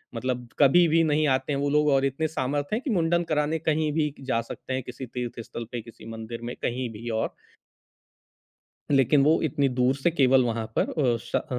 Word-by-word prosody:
मतलब 125 Hz, 0 st, -3 dB
कभी 165 Hz, +5 st, +6 dB
भी 165 Hz, +1 st, +3 dB
नहीं 155 Hz, 0 st, +2 dB
आते 130 Hz, +2 st, +1 dB
हैं 140 Hz, -, -1 dB
वो 145 Hz, -, 0 dB
लोग 150 Hz, +1 st, +3 dB
और 135 Hz, 0 st, +3 dB
इतने 140 Hz, +4 st, -1 dB
सामर्थ्य 145 Hz, +3 st, -2 dB
हैं 235 Hz, -, -2 dB
कि 280 Hz, -, -3 dB
मुंडन 170 Hz, -3 st, +2 dB
कराने 155 Hz, +1 st, +1 dB
कहीं 155 Hz, -1 st, 0 dB
भी 150 Hz, -1 st, +1 dB
क -, -, -12 dB
जा 115 Hz, -3 st, +1 dB
सकते 125 Hz, +2 st, -7 dB
हैं 130 Hz, -1 st, -2 dB
किसी 125 Hz, +1 st, -7 dB
तीर्थस्थल 120 Hz, -1 st, -6 dB
पे, 120 Hz, -2 st, -4 dB
किसी 115 Hz, -1 st, -14 dB
मंदिर 115 Hz, +1 st, -7 dB
में, 120 Hz, +1 st, -5 dB
कहीं 125 Hz, 0 st, -2 dB
भी 115 Hz, +2 st, -7 dB
और। 110 Hz, 0 st, -1 dB, 1.6 s
लेकिन 135 Hz, +1 st, +4 dB
वो 155 Hz, +2 st, +4 dB
इतनी 140 Hz, -2 st, +1 dB
दूर 125 Hz, +1 st, +3 dB
से 140 Hz, +5 st, +1 dB
केवल 135 Hz, -5 st, +4 dB
वहाँ 115 Hz, -2 st, -2 dB
पर -, -, +2 dB, 0.3 s
अ, -, -, 0 dB
श -, -, -3 dB
अ, -, -, -1 dB
135 Hz, 210 wpm, -26 LUFS, 120-155 Hz, 1.6 s, कभी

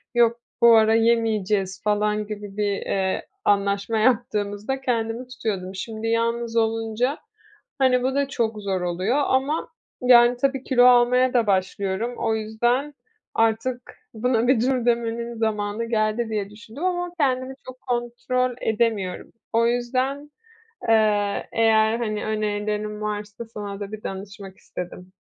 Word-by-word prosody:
"Yok, 235 Hz, 0 st, +4 dB, 0.2 s
bu 235 Hz, -1 st, +8 dB
ara 220 Hz, 0 st, +4 dB
yemeyeceğiz" 215 Hz, -4 st, +1 dB
falan 210 Hz, 0 st, 0 dB
gibi 205 Hz, -1 st, -7 dB
bir, 205 Hz, -1 st, +1 dB
eee, 190 Hz, -1 st, -1 dB, 0.2 s
anlaşma 200 Hz, +2 st, +1 dB
yaptığımızda 215 Hz, +1 st, 0 dB
kendimi 235 Hz, -1 st, -2 dB
tutuyordum. 210 Hz, -7 st, -4 dB
Şimdi 220 Hz, +3 st, -5 dB
yalnız 230 Hz, 0 st, 0 dB
olunca, 225 Hz, +4 st, 0 dB, 0.6 s
hani, 255 Hz, -2 st, +3 dB
bu 265 Hz, +1 st, 0 dB
da 280 Hz, 0 st, +1 dB
çok 225 Hz, -5 st, -2 dB
zor 190 Hz, -2 st, -1 dB
oluyor 180 Hz, +8 st, 0 dB
ama, 270 Hz, +4 st, 0 dB, 0.3 s
yani, 245 Hz, -1 st, +6 dB
tabii, 270 Hz, 0 st, 0 dB
kilo 250 Hz, -2 st, +4 dB
almaya 250 Hz, +1 st, +5 dB
da 235 Hz, -3 st, +2 dB
başlıyorum. 195 Hz, +4 st, -1 dB
O 220 Hz, -, 0 dB
yüzden 240 Hz, +6 st, 0 dB, 0.4 s
artık 225 Hz, +3 st, 0 dB, 0.2 s
buna 235 Hz, +1 st, +1 dB
bir 255 Hz, -3 st, +4 dB
dur 255 Hz, -1 st, +1 dB
demenin 235 Hz, 0 st, -1 dB
zamanı 215 Hz, 0 st, -1 dB
geldi 220 Hz, 0 st, 0 dB
diye 210 Hz, -2 st, -2 dB
düşündüm 220 Hz, +7 st, -10 dB
ama 355 Hz, -1 st, -1 dB
kendimi 260 Hz, -2 st, +1 dB
çok 255 Hz, 0 st, -10 dB
kontrol 245 Hz, +1 st, -1 dB
edemiyorum. 220 Hz, -4 st, -1 dB, 0.2 s
O 230 Hz, +1 st, +3 dB
yüzden, 255 Hz, +4 st, -1 dB, 0.6 s
eee, 210 Hz, -2 st, +2 dB
eğer, 220 Hz, 0 st, +3 dB
hani, 215 Hz, -3 st, -2 dB
önerilerin 210 Hz, 0 st, -2 dB
varsa 210 Hz, +1 st, -4 dB
sana 205 Hz, -3 st, -7 dB
da 200 Hz, 0 st, -6 dB
bir 215 Hz, 0 st, -7 dB
danışmak 195 Hz, 0 st, -7 dB
istedim. 180 Hz, +1 st, -8 dB
225 Hz, 135 wpm, -23 LUFS, 210-245 Hz, 0.6 s, bu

